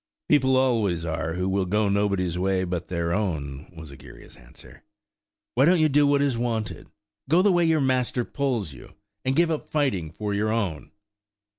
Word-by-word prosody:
"People 130 -3 +4
always 110 -10 +1
are 80 0 -3
who 90 +1 -1
will 95 -1 0
go 105 +3 +1
nobody's 100 -3 0
way 95 +1 0
but 90 -1 -4
their 85 -1 -2
own," 75 -9 -3
was 80 -3 -10
Egeria's 70 - -14
answer; 60 0 -16 0.7
"why 130 +3 +4
don't 175 +2 +4
you 155 -1 +4
do 145 +1 +4
what 140 0 +3
is 130 -5 0
wanted? 115 -3 -3 0.4
Go 170 +4 +4
the 205 - +4
way 175 -1 +3
your 160 -2 +2
master 130 -2 0
pulls 120 - -2
you, 60 - -14 0.3
and 130 +1 0
give 170 +1 +3
up 155 - -4
fighting 130 - 0
for 105 +4 -4
your 105 +2 0
own." 100 -9 -2
105 Hz, 180 wpm, -25 LUFS, 90-135 Hz, 0.7 s, People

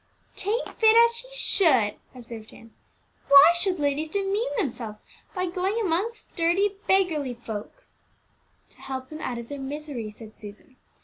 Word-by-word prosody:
"'Tain't 430 +5 -1
fit 445 0 +6
as 470 0 +6
she 475 +2 -4
should," 295 - +3 0.2
observed 230 -3 -10
Ann. 230 -1 -16 0.5
"Why 280 +3 +9
should 365 +1 0
ladies 295 +1 -1
demean 400 +3 -1
themselves 225 -5 -3 0.3
by 365 0 0
going 370 +5 -1
amongst 410 +3 -2
dirty 350 +4 +2 0.2
beggarly 320 -10 +2
folk?" 225 - -8 0.9
"To - - -27
help 260 -1 -6
them 310 0 -8
out 245 - -3
of 235 0 -7
their 285 +2 -7
misery," 270 -4 -5
said 215 0 -13
Susan. 215 +6 -10
310 Hz, 145 wpm, -26 LUFS, 240-390 Hz, 0.9 s, Why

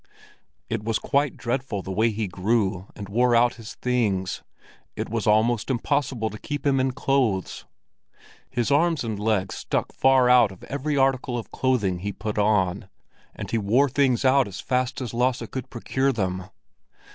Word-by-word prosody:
It 110 -1 -3
was 110 0 0
quite 140 0 0
dreadful 120 -5 -3
the 95 - -6
way 110 +5 +2
he 110 -1 -2
grew 95 0 0
and 100 - -7
wore 120 +4 +2
out 120 +1 +4
his 115 -2 -10
things; 105 -7 -1 0.5
it - - -4
was - - -2
almost 110 +2 +2
impossible 130 -3 -1
to 105 - -9
keep 145 -2 -5
him 135 -2 +3
in 130 +1 +2
clothes! 125 - 0 0.8
His 120 +2 -1
arms 160 0 +2
and 110 -3 -3
legs 105 -3 0
stuck - - -3
far 130 -2 +4
out 125 -4 +6
of 95 - -14
every 145 +2 -2
article 135 -2 +1
of 115 - -7
clothing 105 -9 0
he 100 +3 -3
put 105 +2 -4
on, 100 -2 +1 0.5
and - - -7
he 115 - +1
wore 115 +8 +3
things 135 -1 +2
out 130 -2 +4
as 100 - -8
fast 130 0 -1
as 120 -3 -5
Lasse 125 0 +1
could 130 -1 -5
procure 130 +3 0
them. 95 -5 -2
120 Hz, 170 wpm, -24 LUFS, 105-130 Hz, 0.8 s, out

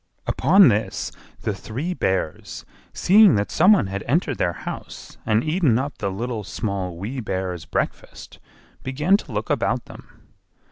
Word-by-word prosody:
Upon 190 +2 +5
this 100 -2 -1 0.3
the 105 - -1
three 130 - -4
Bears, 95 - -2 0.3
seeing 205 0 +5
that 100 0 -1
some 180 +6 +5
one 195 - +2
had 95 0 -4
entered 145 0 0
their 85 - +1
house - - -8
and 110 +1 +2
eaten 155 -7 +2
up 135 0 -4
the 100 - -1
Little, 110 +3 -4
Small, 95 -2 -4
Wee 110 +9 -5
Bear's 95 -6 -4
breakfast, - - -5 0.4
began 150 +9 +2
to - - -11
look - - -3
about - - 0
them. - - -16
115 Hz, 150 wpm, -22 LUFS, 95-155 Hz, 0.4 s, Upon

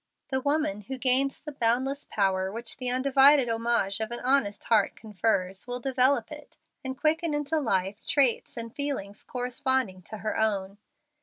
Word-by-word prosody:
The 265 -1 -1
woman 285 -8 0
who 265 +6 -6
gains 260 +2 +1
the 300 - -8
boundless 265 +2 0
power 190 -2 0
which 230 +2 -4
the 255 -1 -1
undivided 270 +1 +5
homage 230 -3 0
of 220 -1 -3
an 240 - -5
honest 250 -6 +1
heart 215 -3 +2
confers 195 -2 -1
will 245 0 -4
develop 265 +2 +1
in - - -6
it, - - -20 0.3
and 260 0 -5
quicken 315 +1 +1
into 295 +2 0
life, 200 -5 -1
traits 270 -5 +2
and 230 0 -5
feelings 275 -9 -4
corresponding 250 -5 -1
to 215 - -6
her 215 +1 -3
own. 200 -2 -1
245 Hz, 165 wpm, -27 LUFS, 210-270 Hz, 0.3 s, undivided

